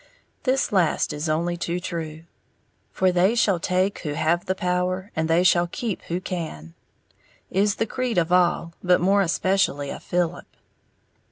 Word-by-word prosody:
This 260 0 +1
last 185 -6 +1
is 150 +2 -3
only 170 +3 0
too 175 +1 -2
true. 160 -3 -5 0.7
"For 185 -1 +2
they 185 +5 +3
shall 200 -6 +2
take 185 +3 0
who 150 -4 -4
have 160 +3 0
the 190 - 0
power, 180 +2 -1
and 160 0 -1
they 165 +2 +4
shall 175 -1 +4
keep 215 +3 -4
who 175 +1 -2
can," 160 - -6 0.8
is 200 +2 +2
the 225 - 0
creed 250 0 -2
of 170 0 +1
all, 175 -2 +2
but 180 -1 +4
more 195 +3 +3
especially 180 -6 +1
of - - -7
Philip. 175 -1 -2
180 Hz, 160 wpm, -24 LUFS, 165-190 Hz, 0.8 s, they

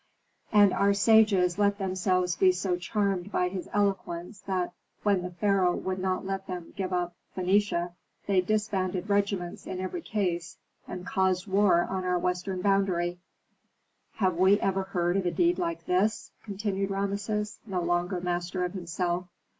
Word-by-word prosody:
And 205 -2 +6
our 200 0 +3
sages 200 -4 +4
let 200 0 +3
themselves 185 -2 0
be 190 -1 +5
so 185 0 -1
charmed 195 +1 -1
by 180 -3 +1
his 185 -1 -6
eloquence, 195 -2 -1
that, 185 -2 -1 0.3
when 200 -3 +3
the 180 - -4
pharaoh 180 0 +2
would 185 0 -3
not 185 0 -1
let 195 0 -3
them 180 -2 -6
give 190 -2 -3
up 175 -1 -1 0.2
Phœnicia, 185 -2 +1 0.3
they 195 -2 +3
disbanded 195 -1 -1
regiments 200 -3 -1
in 185 - -4
every 185 - -4
case, 180 - -2 0.3
and 180 0 -6
caused 190 -1 +1
war 195 -3 +4
on 190 -1 -3
our 180 0 +1
western 180 +1 -2
boundary. 185 -3 +1 1.0
Have 185 -5 +1
we 190 +3 +5
ever 195 0 0
heard 175 -1 0
of 190 -2 0
a - - +1
deed 350 - +2
like 335 -2 -2
this?" 195 +5 0
continued 200 -2 -2
Rameses, 200 +2 -2
no 190 -3 -1
longer 175 +2 0
master 175 +1 -2
of 180 - -4
himself. 175 0 -2
190 Hz, 155 wpm, -28 LUFS, 180-200 Hz, 1.0 s, And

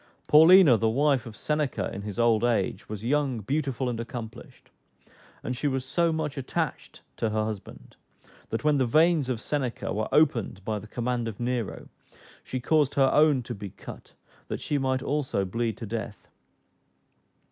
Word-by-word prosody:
Paulina 160 -3 +7
the 110 +1 +1
wife 135 0 +1
of 110 - -9
Seneca 150 -3 -1
in 100 - -5
his 100 -1 -7
old 115 -2 +3
age, 115 -6 0
was 105 0 -6
young, 135 -3 0
beautiful, 135 +2 -2
and 120 -2 -3
accomplished; 115 0 -8 0.7
and 125 - -3
she 145 - -1
was 135 -2 -1
so 170 +4 +1
much 150 -3 -3
attached 130 - -4
to 115 - 0
her 110 0 0
husband, 110 -3 -8 0.5
that 115 - -3
when 150 -2 +3
the 130 - +2
veins 155 +1 +3
of 125 -3 -1
Seneca 130 -1 -3
were 110 +1 -2
opened 120 -10 +1
by 110 -1 -2
the 105 - -11
command 120 +1 -2
of 110 -3 -6
Nero, 120 -3 -3 0.6
she 130 - -4
caused 145 +2 +2
her 135 -1 +4
own 150 -4 +4
to 120 - -6
be 100 -2 -7
cut, - - -12 0.3
that - - -4
she 145 - -1
might 130 -1 0
also 140 -9 -1
bleed 115 +2 -2
to 115 - -6
death. 110 -1 -6
125 Hz, 170 wpm, -27 LUFS, 110-145 Hz, 0.7 s, Paulina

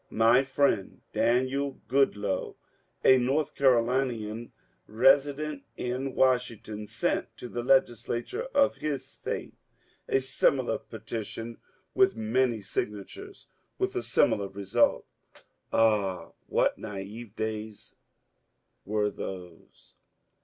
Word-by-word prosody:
My 115 +3 +5
friend 135 -7 0
Daniel 130 +4 +1
Goodloe, 105 -7 +1 0.5
a 130 0 +7
North 135 +5 0
Carolinian 120 -3 +1 0.4
resident 140 +5 +3 0.2
in 130 +2 -3
Washington, 120 -5 0
sent - - -1
to 125 - -7
the 120 0 -4
Legislature 125 - +1
of 280 - +3
his 150 -3 -3
State - - -5 0.6
a - - +3
similar 130 -1 +1
petition 115 +1 -6 0.3
with 195 0 +4
many 115 +1 +1
signatures, 100 0 -5 0.3
with - - -1
a - - 0
similar 100 -1 +2
result. 95 0 +1 0.7
Ah, 105 -5 +2 0.2
*what - - +1
naive 105 +2 -7
days 110 -1 -5 0.9
were 105 0 0
those 90 -3 -9
120 Hz, 95 wpm, -28 LUFS, 105-130 Hz, 0.9 s, a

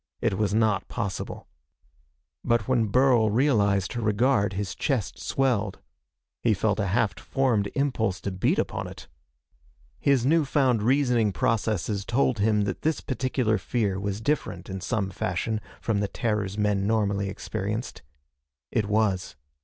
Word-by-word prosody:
It - - +1
was 105 0 0
not 110 -1 +1
possible. 105 -5 -4 1.0
But 120 -3 +1
when 120 -4 +2
Burl 125 0 +4
realized 105 -6 +2
her 120 - -3
regard 105 0 +2
his 100 0 -3
chest 130 -9 -2
swelled. 115 -7 0 0.6
He - - +3
felt - - 0
a 100 - 0
half 105 +1 0
formed 120 -7 0
impulse 115 -9 0
to 100 - -3
beat 95 0 +1
upon - - -2
it. - - -11 0.9
His 135 -4 +2
new 160 +3 +4
found 130 -5 +2
reasoning 120 -3 +2
processes 110 -3 0
told 120 +1 +1
him 105 0 +3
that 100 - -2
this 160 0 0
particular 130 -4 0
fear 105 -6 -1
was 100 +1 -3
different 145 -6 -2
in 95 0 -5
some 100 -2 -1
fashion 95 +5 -2 0.2
from 110 -3 0
the 100 - 0
terrors 105 -2 -2
men 105 -2 +1
normally 100 -2 +1
experienced. 105 +4 -4 0.7
It 105 -2 0
was. 100 -6 0
110 Hz, 145 wpm, -26 LUFS, 100-125 Hz, 1.0 s, Burl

